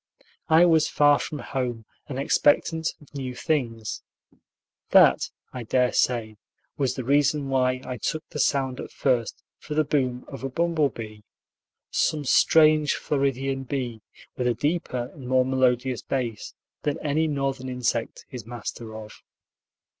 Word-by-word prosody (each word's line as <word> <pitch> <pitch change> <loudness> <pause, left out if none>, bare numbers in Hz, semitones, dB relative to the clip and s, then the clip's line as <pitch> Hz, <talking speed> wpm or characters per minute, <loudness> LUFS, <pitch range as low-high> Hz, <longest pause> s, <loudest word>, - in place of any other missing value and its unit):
I 160 +2 +7
was 160 -3 +4
far 145 -1 +4
from 150 - -5
home, 125 -5 -4 0.2
and 135 -3 -5
expectant 150 +3 +2
of 150 - -19
new 130 -3 -5
things. 120 -7 -2 0.9
That, - - +5 0.2
I 125 - -5
dare 125 +2 +1
say, 110 -4 0 0.4
was 135 -4 0
the 130 - -4
reason 140 +2 +2
why 130 -1 +1
I 125 -1 -5
took 155 +8 -3
the 150 - -5
sound 135 -2 +1
at - - -6
first 120 -5 -1 0.2
for 150 - -6
the 155 - +3
boom 130 -4 -1
of 135 -2 -9
a 135 - -2
bumble 165 0 +1
bee; 110 -3 -9 0.7
some 150 -2 0
strange 155 +1 +5
Floridian 135 -1 -1
bee, 125 -4 -4 0.4
with 125 - 0
a 120 - +1
deeper 135 -3 -2
and 135 -4 -10
more 130 0 +3
melodious 130 -1 +1
bass 120 -6 -4 0.3
than 145 -1 -1
any 155 +2 +1
Northern 135 -3 -2
insect 125 -2 -2
is 125 -3 -7
master 115 -1 -7
of. 110 -1 -11
130 Hz, 145 wpm, -25 LUFS, 125-145 Hz, 0.9 s, I